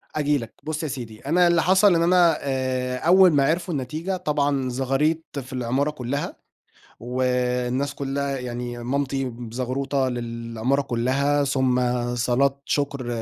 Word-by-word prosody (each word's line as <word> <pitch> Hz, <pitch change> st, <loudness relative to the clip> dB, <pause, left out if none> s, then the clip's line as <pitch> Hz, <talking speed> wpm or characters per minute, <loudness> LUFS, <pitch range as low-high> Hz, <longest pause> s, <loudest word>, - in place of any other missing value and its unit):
آجي 150 Hz, -1 st, +2 dB
لَك، 115 Hz, -4 st, -7 dB
بُصّ 155 Hz, +1 st, -3 dB
يا -, -, -1 dB
سيدي 120 Hz, -6 st, -6 dB
أنا 175 Hz, +5 st, +4 dB
اللي 170 Hz, -1 st, +3 dB
حصل 190 Hz, +1 st, +5 dB
إن 165 Hz, -, +2 dB
أنا 175 Hz, -2 st, +4 dB
آآ، 130 Hz, -2 st, -1 dB
أول 180 Hz, +5 st, +6 dB
ما 140 Hz, -2 st, +4 dB
عِرفوا 170 Hz, +2 st, 0 dB
النتيجة 155 Hz, +8 st, -3 dB
طبعًا 145 Hz, -5 st, 0 dB
زغاريط 140 Hz, +4 st, -1 dB
في 130 Hz, 0 st, -9 dB
العمارة 130 Hz, +4 st, 0 dB
كُلّها، 140 Hz, 0 st, -4 dB, 0.7 s
والناس 125 Hz, +2 st, -1 dB
كُلّها 140 Hz, 0 st, -2 dB
يعني 120 Hz, -1 st, -5 dB
مامتي 135 Hz, +1 st, -1 dB
بزغروطة 130 Hz, +3 st, -2 dB
للعمارة 115 Hz, +2 st, -2 dB
كُلّها، 140 Hz, +4 st, +1 dB
ثم 130 Hz, -2 st, +1 dB, 0.3 s
صلاة 130 Hz, +3 st, +1 dB
شُكر 140 Hz, -3 st, -1 dB
135 Hz, 135 wpm, -24 LUFS, 125-150 Hz, 0.7 s, أول